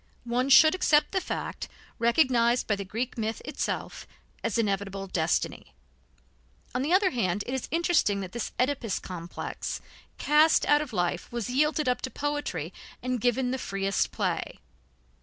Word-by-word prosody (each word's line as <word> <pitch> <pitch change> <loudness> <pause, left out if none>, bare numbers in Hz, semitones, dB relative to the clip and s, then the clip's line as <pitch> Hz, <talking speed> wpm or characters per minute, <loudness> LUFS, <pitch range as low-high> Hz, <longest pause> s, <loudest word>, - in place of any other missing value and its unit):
One 245 +3 0
should 310 +3 +8
accept 310 -5 +3
the 380 - 0
fact, - - -5 0.3
recognized 235 -1 +3
by 210 - +1
the 200 - -5
Greek 230 +6 -4
myth 220 0 -2
itself, - - -4 0.4
as 230 0 0
inevitable 195 -2 -1
destiny. 175 -3 -1 1.0
On 250 - 0
the 290 +5 -1
other 375 +1 +4
hand, 200 -5 0
it 250 - -4
is 265 - -3
interesting 330 - +2
that 185 -2 -6
this 235 +2 -4
Oedipus 250 -5 0
complex, 175 -2 -5 0.4
cast 305 +2 +4
out 295 0 +4
of 300 -4 -5
life, 175 -3 -1
was 240 0 -3
yielded 300 +2 +2
up 250 - +1
to 260 - -3
poetry 290 +2 -3 0.3
and 250 -2 -1
given 250 +1 +1
the 260 - -2
freest 195 -3 -1
play. - - -2
245 Hz, 155 wpm, -28 LUFS, 200-290 Hz, 1.0 s, should